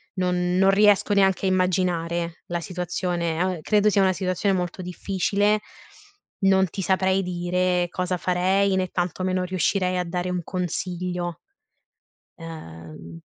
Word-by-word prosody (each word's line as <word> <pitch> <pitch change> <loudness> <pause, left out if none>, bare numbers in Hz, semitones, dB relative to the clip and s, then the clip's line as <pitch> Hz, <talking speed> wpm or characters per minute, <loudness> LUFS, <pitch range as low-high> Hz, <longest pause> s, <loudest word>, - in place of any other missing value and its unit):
non 180 -1 0
non 195 +1 +5
riesco 205 +1 +4
neanche 195 -2 +3
a - - +3
immaginare 175 -2 0
la 175 0 -2
situazione 175 -1 -2
a 185 -1 0
credo 210 +2 +3
sia 200 -1 +3
una 190 -1 +3
situazione 185 +1 0
molto 180 0 -3
difficile, 200 +3 0 0.8
non 190 -1 +4
ti 195 - -5
saprei 190 +1 +2
dire 180 0 0
cosa 180 +1 -2
farei, 190 +2 +1
né 185 -1 0
tantomeno 185 +1 -1
riuscirei 185 0 0
a 180 - 0
dare 180 +1 -3
un 180 -1 -2
consiglio. 180 -1 -3 1.0
Ehm 85 - -10
180 Hz, 130 wpm, -24 LUFS, 175-190 Hz, 1.0 s, non